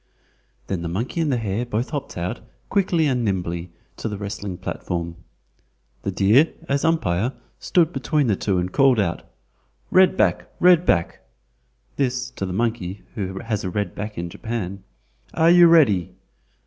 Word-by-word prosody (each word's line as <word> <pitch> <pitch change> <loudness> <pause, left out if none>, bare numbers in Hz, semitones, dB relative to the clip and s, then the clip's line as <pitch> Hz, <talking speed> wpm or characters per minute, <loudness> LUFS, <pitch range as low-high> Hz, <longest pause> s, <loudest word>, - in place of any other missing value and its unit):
Then 95 -3 -3
the 85 - -3
monkey 115 - -2
and 155 -3 +1
the 125 - +1
hare 110 0 -2
both 120 +1 -3
hopped 145 - -5
out, 85 +1 -3 0.3
quickly 185 -5 +2
and 125 -4 +1
nimbly, 90 -4 -2 0.3
to 115 - -3
the 105 - -4
wrestling 100 -2 -5
platform. 85 -2 -4 0.9
The - - -3
deer, 115 +11 +4 0.2
as 140 0 0
umpire, 125 - +1 0.3
stood 170 -1 +2
between 150 -6 0
the 110 -5 +2
two 95 0 -1
and 90 +1 -1
called 135 -4 +4
out: 85 -4 0 0.7
"Red 190 0 +5
back! - - +2
Red 180 -1 +5
back!" 85 -3 +1 0.8
(this 125 -2 -1
to 100 -6 -4
the - - -4
monkey, 105 -2 -2
who 95 -4 -4
has 110 -3 -3
a 95 - -2
red 100 -1 -2
back 105 +1 -6
in 85 +1 -3
Japan). 100 -1 -5 0.5
"Are 165 +1 +5
you 175 -1 +8
ready?" 130 - +4
110 Hz, 160 wpm, -22 LUFS, 95-140 Hz, 0.9 s, you